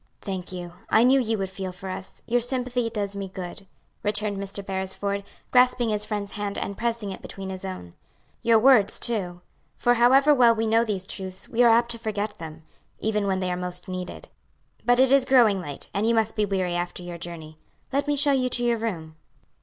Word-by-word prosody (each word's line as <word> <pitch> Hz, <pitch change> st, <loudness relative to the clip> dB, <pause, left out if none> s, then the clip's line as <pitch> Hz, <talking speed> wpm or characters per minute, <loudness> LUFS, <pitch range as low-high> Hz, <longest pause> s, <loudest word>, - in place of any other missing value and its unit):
"Thank 185 Hz, -3 st, -5 dB
you. 175 Hz, -1 st, -7 dB, 0.2 s
I 220 Hz, -, +5 dB
knew 265 Hz, +2 st, +5 dB
you 225 Hz, -3 st, 0 dB
would 190 Hz, -1 st, -3 dB
feel 190 Hz, 0 st, -5 dB
for 180 Hz, +1 st, -9 dB
us; 185 Hz, 0 st, -7 dB
your 245 Hz, +1 st, +1 dB
sympathy 245 Hz, -1 st, -1 dB
does 205 Hz, -3 st, -3 dB
me 200 Hz, -1 st, -4 dB
good," 185 Hz, +1 st, -8 dB, 0.3 s
returned 210 Hz, -1 st, -1 dB
Mr. 200 Hz, 0 st, -5 dB
Beresford, 195 Hz, +1 st, -3 dB, 0.3 s
grasping 250 Hz, -2 st, +4 dB
his 210 Hz, -1 st, 0 dB
friend's 205 Hz, -2 st, -3 dB
hand 205 Hz, -1 st, -4 dB
and 200 Hz, -, -3 dB
pressing 230 Hz, -3 st, -2 dB
it 190 Hz, -, -8 dB
between 195 Hz, -1 st, -7 dB
his 185 Hz, 0 st, -7 dB
own; 185 Hz, -, -7 dB, 0.5 s
"your 230 Hz, -1 st, +5 dB
words 220 Hz, -4 st, +5 dB
too; 180 Hz, -7 st, 0 dB, 0.4 s
for 245 Hz, 0 st, +3 dB
however 265 Hz, +5 st, +5 dB
well 240 Hz, -4 st, +5 dB
we 225 Hz, 0 st, -1 dB
know 225 Hz, +1 st, +3 dB
these 200 Hz, -5 st, -3 dB
truths 190 Hz, -1 st, -5 dB
we 235 Hz, -, 0 dB
are 240 Hz, -, +7 dB
apt 235 Hz, +1 st, +4 dB
to 230 Hz, -, -3 dB
forget 215 Hz, -1 st, -3 dB
them, 160 Hz, -1 st, -9 dB, 0.4 s
even 210 Hz, -2 st, 0 dB
when 190 Hz, -1 st, 0 dB
they 185 Hz, -1 st, -1 dB
are -, -, 0 dB
most 180 Hz, 0 st, -4 dB
needed. 185 Hz, -1 st, -6 dB, 0.6 s
"But 245 Hz, 0 st, +3 dB
it 260 Hz, 0 st, +5 dB
is 275 Hz, -1 st, +6 dB
growing 235 Hz, -7 st, +4 dB
late, 145 Hz, -5 st, -7 dB
and 205 Hz, +3 st, 0 dB
you 235 Hz, -, +3 dB
must 220 Hz, -1 st, +1 dB
be 210 Hz, -, +2 dB
weary 185 Hz, -3 st, -1 dB
after 175 Hz, +1 st, -3 dB
your 175 Hz, -1 st, -7 dB
journey. 160 Hz, -2 st, -8 dB, 0.3 s
Let 280 Hz, +1 st, 0 dB
me 290 Hz, -, +2 dB
show 285 Hz, 0 st, +5 dB
you 255 Hz, -2 st, +2 dB
to 245 Hz, 0 st, +1 dB
your 240 Hz, -1 st, +2 dB
room." 165 Hz, -8 st, -4 dB
205 Hz, 210 wpm, -25 LUFS, 185-235 Hz, 0.6 s, are